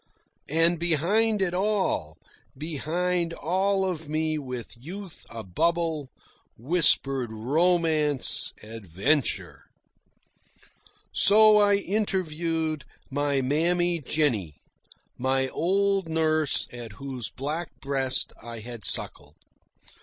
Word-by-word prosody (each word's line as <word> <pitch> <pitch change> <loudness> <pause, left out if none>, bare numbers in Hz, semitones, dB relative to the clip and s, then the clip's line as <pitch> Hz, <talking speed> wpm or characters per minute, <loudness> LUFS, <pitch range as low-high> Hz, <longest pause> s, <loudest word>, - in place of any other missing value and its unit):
And 165 +2 +3
behind 195 +6 +2
it 175 -2 -1
all, 190 - -1 0.4
behind 170 +3 -1
all 190 +5 0
of 160 -4 -5
me 155 0 0
with 125 -4 -7
youth 175 +8 -10
abubble, 155 - -1 0.5
whispered 135 -3 +2
Romance, 155 +3 +1
Adventure. 110 - -1 1.5
So 215 +1 +6
I 205 -1 +4
interviewed 165 -6 -1 0.3
my 145 0 0
Mammy 170 +5 +1
Jennie, 125 - 0 0.6
my 130 +1 +1
old 195 +3 0
nurse 155 -2 +2
at 120 -3 -8
whose 130 -2 -6
black 150 +6 -4
breast 135 -2 -1
I 115 0 -8
had 120 -1 -9
suckled. - - 0
155 Hz, 90 wpm, -26 LUFS, 130-175 Hz, 1.5 s, So